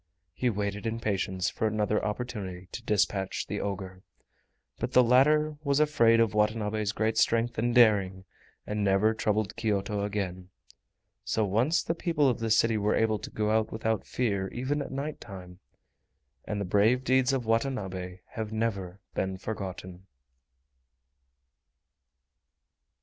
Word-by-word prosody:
He 125 +7 0
waited 105 0 -2
in 115 +1 -2
patience 95 -4 -1
for 110 - -1
another 105 0 0
opportunity 105 -5 -4
to - - -6
dispatch 100 -3 0
the - - -4
ogre. 95 -2 -5 0.8
But 130 - -3
the 125 - +7
latter 150 +5 +4
was 140 -1 +2
afraid 120 -7 +4
of 115 -1 +3
Watanabe's 105 0 0
great 110 0 0
strength 115 0 +2
and 120 +2 0
daring, 100 -5 +4 0.4
and 105 0 -2
never 100 +3 +3
troubled 110 -1 -1
Kyoto 105 -2 -1
again. 95 -3 -4 0.7
So 110 - 0
once 120 - +1
more 165 - +1
the 165 - -17
people 165 -5 +2
of 125 - +1
the 115 0 -2
city 110 0 +3
were 105 +1 +1
able 110 -1 +1
to - - -7
go 105 0 -1
out 110 0 +1
without 110 0 -2
fear 100 -6 -1
even 130 +8 -2
at - - -6
night 140 +3 -4
time, 90 -3 -10 0.9
and 105 - -3
the 100 - -2
brave 110 +7 +3
deeds 130 0 +3
of 130 -3 -1
Watanabe 100 -6 -2
have 110 -3 -5
never 100 -4 -3
been 95 0 -2
forgotten! 95 -2 -6
110 Hz, 145 wpm, -28 LUFS, 100-120 Hz, 0.9 s, the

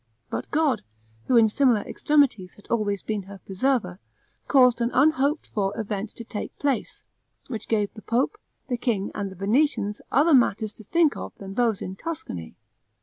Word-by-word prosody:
But - - -4
God, 305 -3 +2 0.4
who 250 - +3
in 225 -1 +7
similar 235 -1 +3
extremities 265 -13 +1
has 205 - -18
always 205 -4 0
been 215 -2 -2
her 200 - -9
preserver, 195 -1 -1 0.5
caused 250 -4 +5
an 235 - +2
unhoped 295 +1 +3
for 205 +1 -1
event 210 -1 -3
to 235 - -8
take 220 -2 -6
place, 280 -5 -2 0.5
which 225 -5 -5
gave 210 -3 0
the 215 - -11
pope, 255 - 0 0.3
the 245 - -1
king, 225 -5 -1
and 200 -2 -3
the 190 - -11
Venetians 210 - +1
other 300 +5 +4
matters 220 -4 +3
to 220 - -13
think 330 - +3
of - - -7
than 195 -1 -8
those 230 -2 +1
in 190 - -5
Tuscany. 190 - -6
225 Hz, 170 wpm, -25 LUFS, 200-270 Hz, 0.5 s, in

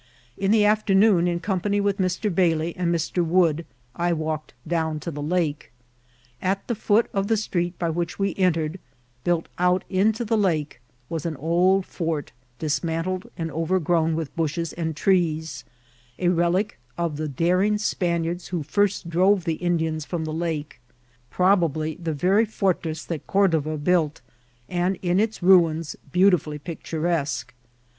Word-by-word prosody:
In 195 0 -1
the 215 0 +5
afternoon, 205 -3 +4
in 170 -1 0
company 200 +2 0
with 200 -1 0
Mr. 185 +2 0
Bailey 165 -2 +1
and 175 -1 0
Mr. 170 +1 0
Wood, 165 -1 +2 0.3
I 175 0 +1
walked 155 -3 -3
down 160 -2 -1
to 170 - -4
the 145 -1 -6
lake. 155 -1 -1 0.7
At 195 +1 -1
the 240 - 0
foot 220 +1 +2
of 195 0 0
the 225 0 +2
street 175 -4 -2
by 170 -2 -1
which 170 +1 -3
we 195 -1 0
entered, 170 -2 0 0.4
built 175 -1 0
out 180 +1 +3
into 215 +5 +2
the 225 0 +1
lake, 155 -10 0 0.3
was 165 +1 -3
an 160 - -3
old 180 +6 +2
fort, 160 -4 -3 0.3
dismantled, 165 +6 -2
and 165 -1 -3
overgrown 165 -1 +1
With 160 -3 -4
bushes 165 0 -2
and 160 -2 -3
trees, 160 -4 0 0.5
a 180 - +1
relic 175 - +1 0.2
of 170 -4 -2
the 155 0 -2
daring 180 +9 +2
Spaniards 175 -4 -1
who 175 -4 -3
first 200 +3 0
drove 185 +3 +3
the 165 -2 -1
Indians 160 -3 0
from 160 +1 -3
the 155 - -4
lake; 155 -5 -3 0.5
jHrobably 170 -4 +1
the 160 -1 -1
very 195 +9 +2
fwtress 175 -6 -1
that 165 -5 -5
Cordova 160 -6 +2
built, 155 0 +1 0.5
and 180 +1 0
in 180 +1 +2
its 220 -3 -1
ruins 165 -4 +4 0.2
beautifully 180 -5 +3
picturesque. 160 -1 -3
170 Hz, 150 wpm, -24 LUFS, 160-190 Hz, 0.7 s, the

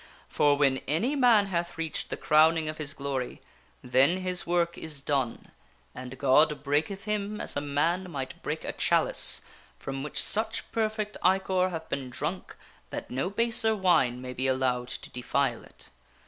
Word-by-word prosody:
For 145 -1 +3
when 135 -2 +3
any 185 - 0
man 240 -7 +5
hath 175 -3 -3
reached 160 -2 -3
the - - -4
crowning 155 +1 +4
of 155 0 -5
his 145 -2 -1
glory, 135 -3 -4 0.4
then 135 +9 +3
his 180 -1 -1
work 170 0 +1
is 155 -3 -7
done 135 -4 -2 0.4
and 130 +1 -8
God 145 +3 +3
breaketh 155 +8 -1
him 210 0 -2
as - - -5
a 145 - -1
man 165 +6 0
might 135 -4 -6
break - - -4
a - - -4
chalice - - +2 0.4
from 135 0 -5
which 150 - -3
such 220 +1 -1
perfect 215 -1 -2
ichor 185 0 +2
hath 160 -2 -6
been 135 -2 -4
drunk 150 +9 -4 0.3
that - - -6
no 135 +8 -1
baser 225 +1 +4
wine 135 - +2
may 125 0 -6
be 130 +2 -1
allowed 130 -2 0
to - - -8
defile 125 -1 -1
it. - - -15
155 Hz, 165 wpm, -28 LUFS, 135-190 Hz, 0.4 s, man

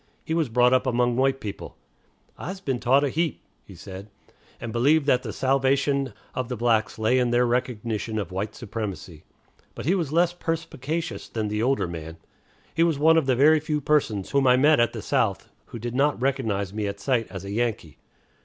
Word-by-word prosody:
He 160 - -2
was 160 -5 +1
brought 125 +2 +4
up 130 +1 +2
among 120 -1 +1
white 135 +1 +2
people 105 -5 -7 0.6
("I's 190 +1 -6
been 135 -10 -2
taughted 130 +4 +3
a - - -7
heap," 165 0 -1 0.2
he 95 - -14
said), 95 +3 -10 0.5
and 115 -2 -6
believed 140 +6 +3
that 125 -3 +3
the - - -5
salvation 135 +1 +1 0.2
of 130 -2 -3
the 125 - -3
blacks 110 -2 +1
lay 110 +4 +2
in 125 -1 +1
their 120 +1 +3
recognition 120 -3 -2
of 100 -5 -3
white 105 +4 -4
supremacy. 100 -8 -6 0.5
But - - -7
he 170 - +3
was 170 -7 -1
less 170 +2 +3
perspicacious 165 -2 -4
than 110 -2 -3
the 105 +1 -1
older 130 -4 +1
man. 80 -1 -7 0.6
He 165 - 0
was 165 -3 +3
one 160 +3 +5
of 160 -4 +2
the 130 - +3
very 155 +5 +5
few 150 0 -2
persons 135 -10 0
whom 140 -1 +3
I 125 0 +6
met 150 +2 +5
at 120 - +2
the - - -6
South - - 0 0.2
who - - -8
did 120 +1 -5
not 140 +3 +1
recognize 110 -8 -1
me 105 -1 -2
at 100 0 -5
sight 115 +1 0
as 95 -1 -7
a 100 - -6
Yankee. 110 -8 -2
125 Hz, 200 wpm, -25 LUFS, 110-140 Hz, 0.6 s, I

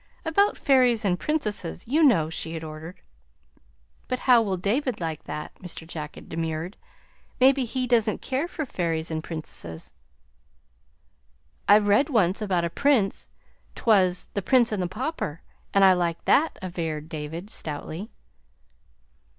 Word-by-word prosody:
"About 400 +6 +2
fairies 250 -6 +3
and 180 -2 +1
princesses, 210 - -2
you 295 +7 +2
know," 215 - +5
she 160 0 -4
had 160 - -5
ordered. 160 +3 -9 1.1
"But 255 - -1
how 245 -3 +6
will 195 -4 -1
David 230 +6 -1
like 160 -3 -4
that?" 150 - -6
Mr. 180 -3 -8
Jack 155 -2 -7
had - - -12
demurred. 165 +3 -3 0.6
"Maybe 265 0 +5
he 255 +2 -2
doesn't 230 -3 +2
care 270 +5 -2
for 320 -4 -4
fairies 165 -8 -2
and 160 0 -3
princesses." 120 - -8 1.7
"I 205 - +8
read 210 +7 +3
one 220 - +4
once 190 - -5
about 185 -5 +1
a 170 - -3
prince 245 -4 +1 0.5
't - - -10
was 185 -5 +3
'The 200 - -1
Prince 240 +3 +3
and 210 -3 -1
the 180 - 0
Pauper,' 215 - -4 0.3
and 195 -1 +5
I 190 - +8
liked 170 -2 -1
that," 315 +3 +3
averred 165 -4 -4
David 160 +6 -6
stoutly. 160 +6 -5
190 Hz, 150 wpm, -25 LUFS, 165-245 Hz, 1.7 s, I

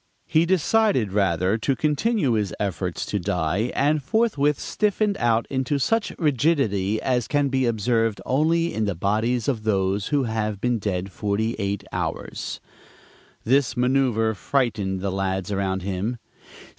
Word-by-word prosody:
He 165 0 +2
decided 185 - +2
rather 95 +1 +1
to 135 +4 0
continue 155 - +1
his 105 -4 0
efforts 95 -3 -2
to 105 - -2
die, 90 +4 -1
and 150 +2 +2
forthwith 150 - +1
stiffened 210 -1 0
out 115 -1 +2
into 135 +1 -1
such 225 - +1
rigidity 130 - +1
as 125 -3 0
can 145 -1 +1
be 130 -2 +1
observed 115 -1 +1
only 165 +5 +1
in 110 - 0
the 100 -3 -1
bodies 110 +6 0
of 125 -6 0
those 100 -2 0
who 145 -2 +1
have 110 -3 -2
been 120 +1 0
dead 95 -2 -3
forty 105 +3 -1
eight 100 -1 -2
hours. - - -4 0.8
This 130 +1 +2
manoeuver 125 -3 +2
frightened 105 -6 -1
the 100 0 -1
lads 95 +1 -2
around 95 -2 -1
him. 100 +5 -2
115 Hz, 145 wpm, -24 LUFS, 100-140 Hz, 0.8 s, He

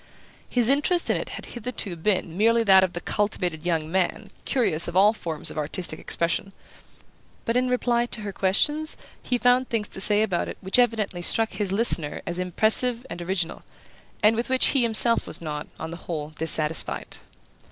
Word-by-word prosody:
His 245 -3 +1
interest 295 +6 +2
in - - 0
it - - -6
had - - -9
hitherto 235 -6 -4
been 170 -1 -2
merely 230 +4 +2
that 190 -3 +5
of 185 - -2
the 175 - -5
cultivated 180 -6 -3
young 165 -3 -2
man 190 +3 -2
curious 200 - +1
of 170 - -6
all 205 +3 +5
forms 165 -7 -3
of - - -5
artistic 155 +2 -3
expression; 170 +4 -1 0.9
but 230 - -1
in 250 0 +1
reply 240 -1 0
to 235 - -4
her 205 -2 -6
questions 295 +13 0 0.2
he 250 - -1
found 250 +1 +2
things 220 -3 -2
to 190 - 0
say 210 +1 +6
about 185 -5 -2
it - - -8
which 190 +6 0
evidently 220 -7 0
struck 225 +5 0
his 205 -3 -4
listener 195 -8 +1
as 175 +1 -3
impressive 220 +7 +4
and 170 +1 -7
original, 175 -1 -3 0.6
and 215 +2 +5
with 235 +3 -3
which 260 0 +2
he 275 - +1
himself 230 0 +4
was - - -5
not, 150 -2 -6
on 160 +1 -6
the 170 - -7
whole, 155 -3 -6
dissatisfied. 155 -1 +1
200 Hz, 185 wpm, -24 LUFS, 170-235 Hz, 0.9 s, say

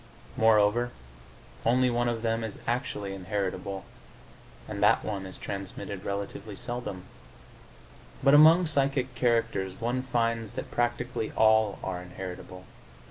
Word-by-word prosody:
Moreover, 110 +2 +4 0.7
only 125 +2 +3
one 120 0 +1
of 115 -1 -3
them 115 0 0
is 110 -2 -5
actually 120 -5 -2
inheritable, 95 0 -3 0.8
and 100 -2 -5
that 105 - +4
one 100 -3 -3
is 95 - -9
transmitted 100 0 -6
relatively 100 +1 -5
seldom. 120 -5 -5 1.2
But 140 - +6
among 160 +4 +8
psychic 135 -4 0
characters 115 -6 0
one 120 +2 -1
finds 115 -3 -1
that - - -6
practically 120 -1 -1
all 110 -2 +4
are 90 -2 -3
inheritable. 90 0 -8
110 Hz, 120 wpm, -28 LUFS, 100-120 Hz, 1.2 s, among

